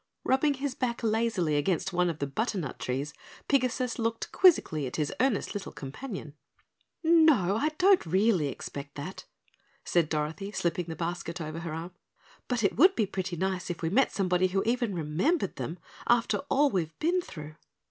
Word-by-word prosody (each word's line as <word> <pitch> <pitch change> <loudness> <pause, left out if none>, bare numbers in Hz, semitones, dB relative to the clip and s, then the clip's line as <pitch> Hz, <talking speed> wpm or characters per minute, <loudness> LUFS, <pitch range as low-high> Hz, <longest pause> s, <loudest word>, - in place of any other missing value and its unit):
Rubbing 280 +2 +2
his 275 0 -3
back 240 -3 -2
lazily 220 -8 +1
against 180 +5 0
one 180 0 +2
of 165 - -3
the 145 - -2
butternut 185 - -3
trees, 135 +4 -3 0.3
Pigasus 255 -2 +1
looked 230 0 -2
quizzically 160 - +4
at - - -6
his 150 -2 -1
earnest 255 -4 +1
little 205 -2 -5
companion. 155 - -7 0.7
"No, 315 - +5
I 290 +8 +1
don't 380 +1 +5
really 190 -2 +3
expect 140 +1 -7
that," 150 +7 -7 0.6
said 170 -3 +2
Dorothy, 160 +6 -2
slipping 175 -1 -1
the 165 -1 -6
basket 170 0 -4
over 155 0 -5
her 170 -1 -5
arm, 165 +3 -6 0.6
"but 245 -3 -1
it 200 - +1
would 370 +8 +6
be 220 - +2
pretty 185 -2 -4
nice 185 +1 -2
if 175 -1 -5
we 165 - 0
met 265 +7 +3
somebody 185 -1 +2
who 195 +1 0
even 235 -3 0
remembered 175 - 0
them, 165 - -4 0.3
after 235 -1 +3
all 285 +1 +3
we've 165 -4 -2
been 350 +3 +1
through." 155 - -9
190 Hz, 170 wpm, -29 LUFS, 160-245 Hz, 0.7 s, would